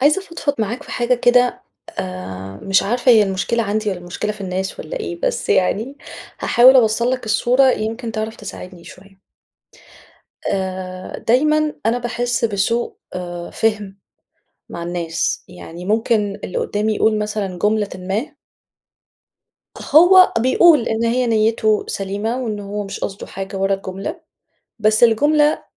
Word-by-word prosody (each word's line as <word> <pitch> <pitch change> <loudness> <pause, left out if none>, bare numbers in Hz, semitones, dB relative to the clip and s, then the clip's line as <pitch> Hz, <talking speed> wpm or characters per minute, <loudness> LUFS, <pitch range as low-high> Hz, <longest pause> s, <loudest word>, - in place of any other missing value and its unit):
عايزة 300 +8 +3
أفضفض 335 -6 -3
معاك 220 +4 -2
في - - -13
حاجة 240 +1 +1
كده 245 0 +2 0.4
آآ، 95 +1 -6
مش 195 -1 +3
عارفة 245 +4 +3
هي 220 -2 +6
المشكلة 200 +4 -1
عندي 215 0 -1
والَّا 190 -3 -3
المشكلة 175 +4 -4
في 210 - -14
الناس 190 0 -4
والَّا 155 - -6
إيه؟! 170 0 -5
بس - - -1
يعني 215 +8 +1 0.4
هاحاول 255 +2 +6
أوصّل 235 0 +3
لك 255 -3 -3
الصورة 250 +5 +3
يمكن 225 +2 -4
تعرف 220 0 -4
تساعدني 180 -2 -10
شوية. 195 +1 -15 1.3
آآ، 185 -1 -4
دايمًا 305 +5 +3
أنا 235 +2 +2
باحس 240 -1 -2
بسوء 220 +3 0 0.2
آآ، 175 -1 -6
فِهم 210 -3 -1 0.7
مع 170 - -7
الناس، 170 -1 -2
يعني 170 +2 -10
ممكن 210 0 0
اللي - - -3
قدّامي 215 +1 -1
يقول 220 -1 +2
مثلًا 210 -3 -3
جملةٍ 210 -1 +1
ما 200 +11 -4 1.6
هو 365 +4 +8
بيقول 260 +3 +4
إن 225 +1 -1
هي 245 +2 +1
نيته 220 -1 +2
سليمة 205 +4 -3
وإن 215 -4 -3
هو 205 +1 -5
مش 195 0 -7
قصدُه 195 - -5
حاجة 195 0 -7
ورا 195 +1 +1
الجملة، 195 - -6 0.6
بس 215 +1 +3
الجملة 295 +6 +3
215 Hz, 140 wpm, -19 LUFS, 195-240 Hz, 1.6 s, هو